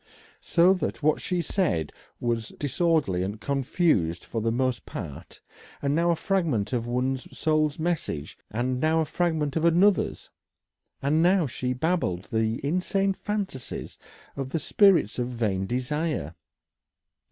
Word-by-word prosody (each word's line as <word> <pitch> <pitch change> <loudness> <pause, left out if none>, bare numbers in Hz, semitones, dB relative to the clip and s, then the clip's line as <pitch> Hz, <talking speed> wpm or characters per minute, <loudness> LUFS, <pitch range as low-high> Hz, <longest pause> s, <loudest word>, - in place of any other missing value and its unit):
So 175 +2 +4
that 180 -4 -3
what 155 +1 +3
she 180 -2 -1
said 150 - 0 0.3
was 115 -2 -1
disorderly 150 - +1
and 100 +3 -3
confused 135 - +1
for 115 - -3
the 115 +1 +1
most 125 -3 -1
part; - - -8 0.4
now 160 +5 +2
a 170 - +4
fragment 160 - 0
of 120 -1 -1
one 125 +2 0
soul's 155 +2 0
message, 160 - -2
and 125 +4 -1
now 160 +3 +2
a - - 0
fragment 155 -3 -1
of 160 - 0
another's, 175 +4 +3 0.7
and 150 +3 +3
now 180 0 +4
she 125 -1 -2
babbled 125 - -1
the 110 +1 +1
insane 195 +5 +1
fancies 195 - -5 0.4
of 135 -1 -4
the 150 - -1
spirits 175 - +4
of 120 - 0
vain 105 -6 -1
desire. 130 - -2
145 Hz, 135 wpm, -26 LUFS, 115-170 Hz, 0.7 s, So